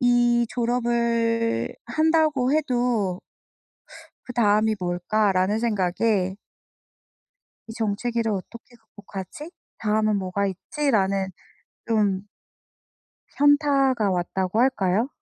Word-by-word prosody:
'이 240 -1 +3
졸업을 235 - 0
한다고 310 -1 +2
해도 240 -10 0 1.0
그다음이 215 -3 +2
뭘까?'라는 185 +2 +1
생각에 195 -3 0 1.3
'이 - - -7
정체기를 225 +2 -1
어떻게 235 +5 -8
극복하지? 210 - -10 0.3
다음은 215 -1 +1
뭐가 195 +1 -1
있지?'라는 195 - 0 0.6
좀 205 -4 +1 1.1
현타가 275 -6 +3
왔다고 185 +3 -1
할까요? 220 -3 +1
225 Hz, 200 characters per minute, -24 LUFS, 195-245 Hz, 1.3 s, 이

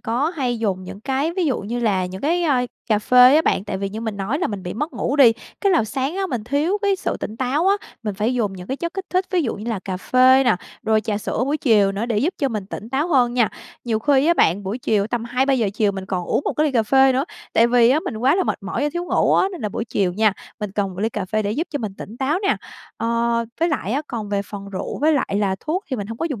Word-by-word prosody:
có 250 +8 0
hay 245 -4 -1
dùng 195 -4 -1
những 195 - -9
cái 275 +7 -1
ví 370 - +1
dụ 265 - +1
như 230 +5 -4
là 190 -5 +1
những 185 +1 -8
cái, 345 +4 +1
ơ, 290 -6 +2 0.3
cà 215 -2 +3
phê 250 +4 +6
á 320 - +4
bạn. 195 - +1
Tại 195 - -3
vì 195 - -2
như 215 +3 -6
mình 220 -3 -4
nói 200 +9 -2
là 355 - 0
mình 200 -3 -5
bị 180 - -5
mất 300 +8 -3
ngủ 280 - -2
đi, 250 -5 +7 0.3
cái 395 -2 +3
là 320 - +3
sáng 270 - -3
á, 390 - 0
mình 245 - -4
thiếu 295 - 0
cái 400 -1 +2
sự - - -2
tỉnh 220 - -5
táo 270 +8 0
á, 400 - +4 0.3
mình 210 -3 -3
phải 220 +5 0
dùng 210 -5 0
những 180 -1 -9
cái 265 - -3
chất 340 +4 -4
kích 385 -1 -4
thích 370 +1 +1
ví 360 -3 +2
dụ 235 - -2
như 220 +4 -5
là 220 - -1
cà 185 -2 -3
phê 255 +6 +4
nè, 235 -7 +3 0.3
rồi 220 0 +2
trà 215 -2 -2
sữa 225 - -2
buổi 285 +3 0
chiều 210 -8 +3
nữa 210 +4 -2
để 225 -3 0
giúp 335 - 0
cho 275 -4 +1
mình 210 -5 -4
tỉnh 215 - -7
táo 280 +7 0
hơn 245 -5 +3
nha. 235 -3 +3 0.4
Nhiều 225 -2 0
khi 280 +3 +3
á 340 - +4
bạn, 190 - +2
buổi 200 +6 -4
chiều 210 -4 +1
tầm 230 0 -3
2:00-3:00 250 -2 +1
chiều 210 -2 +1
mình 190 -1 -6
còn 180 -3 -2
uống - - 0
một - - 0
cái 305 - +3
ly 280 - -1
cà 230 - +3
phê 265 +4 +4
nữa. 265 +3 +1 0.3
Tại 230 - +5
vì 240 0 +5
á, 300 - +3
mình 225 - -5
quá 260 +7 +3
là 375 - +1
mệt - - -1
mỏi 195 +8 -3
và 295 - +2
thiếu 345 0 -3
ngủ - - +2
á, 380 - +3
nên 355 - -7
là 210 - -1
buổi 225 - -4
chiều 195 -5 0
nha, 215 +1 +3 0.3
mình 205 -2 -4
cần 205 -1 0
một 180 - -6
ly 220 - +1
cà 205 -4 -4
phê 215 +3 -1
để 205 - -2
giúp 320 +8 -2
cho 290 - -2
mình 210 -4 -5
tỉnh 220 +4 -8
táo 280 +6 0
nè. 395 - +2 0.4
Ờ, 235 0 0 0.2
với 335 - +3
lại 250 - -2
á, 285 +3 0
còn 220 -6 -5
về 200 -1 0
phần 200 -1 -8
rượu 190 - -5
với 310 +3 +3
lại 260 -8 0
là 190 -2 0
thuốc 360 +7 -2
thì 260 - -1
mình 205 - -4
hông 225 +1 -7
có 330 - -1
dùng 240 -7 -4
235 Hz, 300 wpm, -21 LUFS, 210-285 Hz, 0.4 s, đi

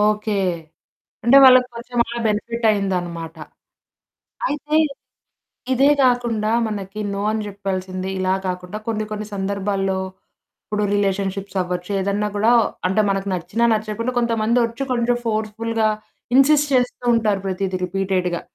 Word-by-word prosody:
Okay, 210 0 +1 0.9
అంటే 240 +4 +6
వాళ్ళకి 255 -1 +7
కొంచెం 240 +1 -6
అలా 235 - -6
బెనిఫిట్ 230 +2 -2
అయిందన్నమాట. 175 -5 -2 1.1
అయితే, 300 -5 -3 1.0
ఇదే 270 +3 +4
కాకుండా 235 -4 +1 0.2
మనకి 205 -1 -5
నో 200 - -3
అని 220 - -1
చెప్పాల్సింది 190 -2 -4
ఇలా 185 0 +1
కాకుండా 180 +2 -4
కొన్ని 215 -1 -1
కొన్ని 215 0 -4
సందర్భాల్లో 195 -1 -1 0.7
ఇప్పుడు 210 0 -2
రిలేషన్షిప్స్ 195 -1 -1
అవ్వచ్చు, 180 +1 -5
ఏదన్నా 200 +2 0
కూడా 215 +3 +3 0.4
అంటే 190 +3 +1
మనకు 195 0 -1
నచ్చినా 200 +7 -1
నచ్చకపోయిన 220 +3 -2
కొంతమంది 230 0 +1
వచ్చి 230 +3 -4
కొంచెం 240 0 +1
ఫోర్స్ఫుల్‌గా 220 0 0 0.5
ఇన్సిస్ట్ 295 +2 +5
చేస్తూ 250 -1 0
ఉంటారు. 215 -4 +1
ప్రతీది 190 0 -2
రిపీటెడ్‌గా 185 -1 -1
210 Hz, 120 wpm, -21 LUFS, 195-230 Hz, 1.1 s, వాళ్ళకి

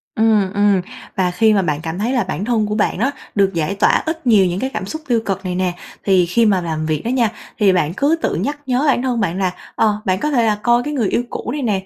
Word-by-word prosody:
Ừm, 215 -3 +2
ừm, 205 -2 +3 0.3
và 185 -2 +1
khi 215 +5 +3
mà 200 - +3
bạn 150 -4 -1
cảm 165 +3 -4
thấy 235 +5 0
là 245 -5 +2
bản 190 +1 -4
thân 225 -2 +1
của 210 - -2
bạn 210 -2 0
đó, 265 +4 +1 0.2
được 195 -1 +2
giải 170 +3 -1
tỏa - - +3
ít 320 -3 -4
nhiều 210 -5 +5
những 180 +1 -1
cái 265 - -2
cảm 215 -3 -3
xúc 315 +10 -6
tiêu 240 -3 +2
cực 195 -1 -3
này 180 -1 -2
nè. 180 -1 0 0.3
Thì 185 -3 +3
khi 205 +7 +2
mà 195 -4 +3
làm 160 -2 -3
việc 155 -2 -1
đó - - -1
nha, 240 -4 +1 0.3
thì 200 -3 +4
bạn 170 -3 0
cứ 290 +4 +3
tự - - 0
nhắc 290 +1 -2
nhớ 255 +1 0
bản 265 - +3
thân 250 -2 -1
bạn 190 -4 -1
là, 185 -2 0 0.2
ờ, 215 -1 +1
bạn 185 0 +1
có 300 - -1
thể 240 -5 +2
là 215 - +2
coi 240 0 +3
cái 295 - -4
người 240 -8 0
yêu 245 - 0
cũ - - -5
này 295 - -3
nè, 200 -5 -1
205 Hz, 285 wpm, -18 LUFS, 185-240 Hz, 0.3 s, nhiều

